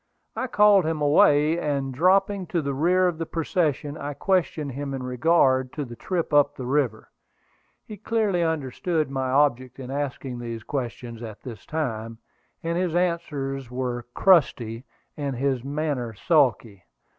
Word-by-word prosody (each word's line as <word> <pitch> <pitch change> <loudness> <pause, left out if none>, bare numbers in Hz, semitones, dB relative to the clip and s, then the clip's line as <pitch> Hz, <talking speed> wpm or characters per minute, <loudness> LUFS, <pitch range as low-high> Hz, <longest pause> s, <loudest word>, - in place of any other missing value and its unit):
I 260 - -2
called 210 -4 +5
him 160 -1 -1
away, 150 +2 +4
and 140 -4 -2
dropping 190 +5 +2
to 170 -2 -1
the 140 0 -2
rear 180 +6 +3
of 170 -2 -2
the 165 - -3
procession, 155 -3 -1
I 145 0 -5
questioned 165 -6 0
him 140 +1 -4
in 130 - -5
regard 130 -1 +2
to 150 - -4
the 120 -1 -9
trip 170 +3 -3
up 145 0 +4
the 130 - -6
river. 130 -4 -1 0.7
He 210 - -9
clearly 210 -3 0
understood 160 0 -1
my 130 -1 -2
object 130 -2 +1
in 130 0 -7
asking 135 -3 -4
these 115 -2 -6
questions 120 -3 -5
at 110 -3 -9
this 115 -6 -9
time, 115 -7 -3 0.5
and 170 +1 -1
his 180 -3 -1
answers 145 -7 -2
were 125 -1 -4
crusty, 130 - +3 0.3
and 140 -3 -3
his 130 -1 -1
manner 140 -5 -3
sulky. 120 - +1
145 Hz, 155 wpm, -25 LUFS, 125-165 Hz, 0.7 s, called